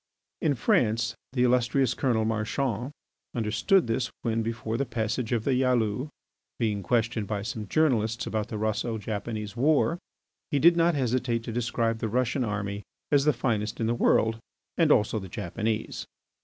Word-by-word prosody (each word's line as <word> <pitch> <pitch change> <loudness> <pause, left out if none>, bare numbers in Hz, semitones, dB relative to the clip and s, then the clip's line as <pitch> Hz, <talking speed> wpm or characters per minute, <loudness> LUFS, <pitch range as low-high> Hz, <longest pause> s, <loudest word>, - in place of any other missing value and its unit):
In 150 -3 +2
France 115 -1 +2 0.2
the 125 -2 +2
illustrious 125 +1 +2
Colonel 115 -5 +1
Marchand 115 +3 -1 0.4
understood 120 - +2
this 115 +2 -1
when, 115 -1 0
before 115 0 -3
the 135 - +1
passage 115 -1 -2
of 115 -3 +1
the 140 - +1
Yalou, 125 0 +1 0.5
being 105 -4 0
questioned 115 +1 0
by 105 -2 -2
some 110 -2 -5
journalists 115 -5 +1
about 110 0 -2
the 110 - -5
Russo 110 +2 -1
Japanese 105 0 -4
war, 155 +5 +2 0.5
he 145 - +1
did 170 +5 +6
not 170 -1 +3
hesitate 125 -3 0
to 115 - -5
describe 115 -1 -1
the 110 - -2
Russian 125 +3 0
army 100 -2 -3 0.3
as 140 -1 +4
the 150 - +6
finest 110 -3 -1
in 115 - 0
the 115 - +1
world, 115 -1 +2 0.4
and 165 -3 +3
also 110 -2 +3
the 95 -2 -8
Japanese. 105 +3 -3
115 Hz, 160 wpm, -27 LUFS, 110-125 Hz, 0.5 s, did